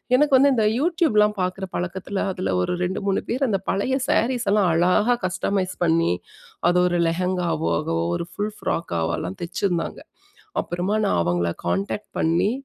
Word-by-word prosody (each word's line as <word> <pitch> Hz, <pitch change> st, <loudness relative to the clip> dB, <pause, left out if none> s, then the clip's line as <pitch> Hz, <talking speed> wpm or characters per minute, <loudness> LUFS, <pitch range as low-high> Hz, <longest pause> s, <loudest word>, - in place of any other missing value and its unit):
எனக்கு 290 Hz, +2 st, +3 dB
வந்து 280 Hz, +2 st, +5 dB
இந்த 225 Hz, -4 st, +2 dB
யூடியூப்லாம் 280 Hz, -10 st, +3 dB
பாக்குற 185 Hz, +1 st, -2 dB
பழக்கத்தில, 190 Hz, +3 st, -3 dB
அதில 95 Hz, -, -2 dB
ஒரு 90 Hz, -, -1 dB
2, 180 Hz, +2 st, -1 dB
3 195 Hz, -1 st, +1 dB
பேர் 260 Hz, +4 st, 0 dB
அந்த 205 Hz, -4 st, +1 dB
பழைய 205 Hz, +7 st, 0 dB
ஸேரீஸ்லாம் 220 Hz, -5 st, +2 dB
அழகா 180 Hz, +8 st, +3 dB
கஸ்டமைஸ் 185 Hz, 0 st, -1 dB
பண்ணி, 165 Hz, -, +3 dB, 0.6 s
அது 175 Hz, 0 st, +3 dB
ஒரு 175 Hz, 0 st, 0 dB
லெஹெங்காவ் 180 Hz, +1 st, -1 dB
ஆகவோ, 80 Hz, 0 st, -1 dB
ஒரு -, -, -3 dB
ஃபுல் 210 Hz, +4 st, -3 dB
ஃப்ராக்காவோ 85 Hz, -, -2 dB
எல்லாம் 90 Hz, +1 st, -5 dB
தெச்சிருந்தாங்க. 175 Hz, 0 st, -2 dB, 0.6 s
அப்புறமா, 180 Hz, +4 st, -2 dB
நான் 145 Hz, -, +1 dB
அவங்கள 85 Hz, 0 st, 0 dB
கான்டாக்ட் 100 Hz, +5 st, -2 dB
பண்ணி, 170 Hz, +6 st, +2 dB
185 Hz, 145 wpm, -23 LUFS, 165-210 Hz, 0.6 s, வந்து